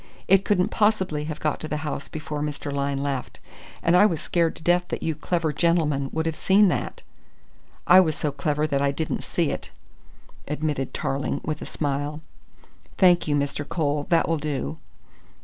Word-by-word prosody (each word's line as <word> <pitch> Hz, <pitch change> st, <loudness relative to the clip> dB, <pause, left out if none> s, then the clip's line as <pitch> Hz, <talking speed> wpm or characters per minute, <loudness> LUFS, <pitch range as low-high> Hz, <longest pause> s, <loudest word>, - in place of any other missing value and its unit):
It 195 Hz, +1 st, +5 dB
couldn't 180 Hz, -3 st, +2 dB
possibly 190 Hz, -8 st, +1 dB
have 155 Hz, -1 st, -5 dB
got 155 Hz, -, -1 dB
to 155 Hz, -, -5 dB
the 150 Hz, -, -2 dB
house 145 Hz, -1 st, -4 dB
before 150 Hz, -1 st, -5 dB
Mr. 145 Hz, -1 st, -3 dB
Lyne 140 Hz, 0 st, -1 dB
left, 140 Hz, -3 st, -4 dB, 0.4 s
and 170 Hz, -, +4 dB
I 205 Hz, +4 st, +7 dB
was 165 Hz, -6 st, -2 dB
scared 165 Hz, +1 st, 0 dB
to -, -, -13 dB
death 175 Hz, +1 st, +2 dB
that -, -, -4 dB
you 160 Hz, -, 0 dB
clever 160 Hz, +1 st, -1 dB
gentlemen 150 Hz, -5 st, +1 dB
would 160 Hz, 0 st, -1 dB
have 160 Hz, -1 st, -1 dB
seen 195 Hz, +4 st, +4 dB
that." -, -, -3 dB, 0.8 s
"I 180 Hz, +2 st, +8 dB
was 160 Hz, -5 st, +3 dB
so 150 Hz, -, -1 dB
clever 150 Hz, +2 st, -1 dB
that 140 Hz, -3 st, 0 dB
I 140 Hz, -, +3 dB
didn't 155 Hz, +3 st, -3 dB
see -, -, 0 dB
it," -, -, -5 dB, 0.8 s
admitted 150 Hz, -3 st, -2 dB
Tarling 135 Hz, +1 st, -2 dB
with 155 Hz, -1 st, -3 dB
a -, -, -6 dB
smile. 145 Hz, +1 st, -2 dB, 0.8 s
"Thank 175 Hz, -3 st, +5 dB
you, 145 Hz, -, +2 dB
Mr. 145 Hz, 0 st, -1 dB
Cole, 145 Hz, -3 st, -1 dB
that 170 Hz, -1 st, +3 dB
will 165 Hz, -, +1 dB
do." 135 Hz, -, -3 dB
155 Hz, 185 wpm, -24 LUFS, 145-170 Hz, 0.8 s, I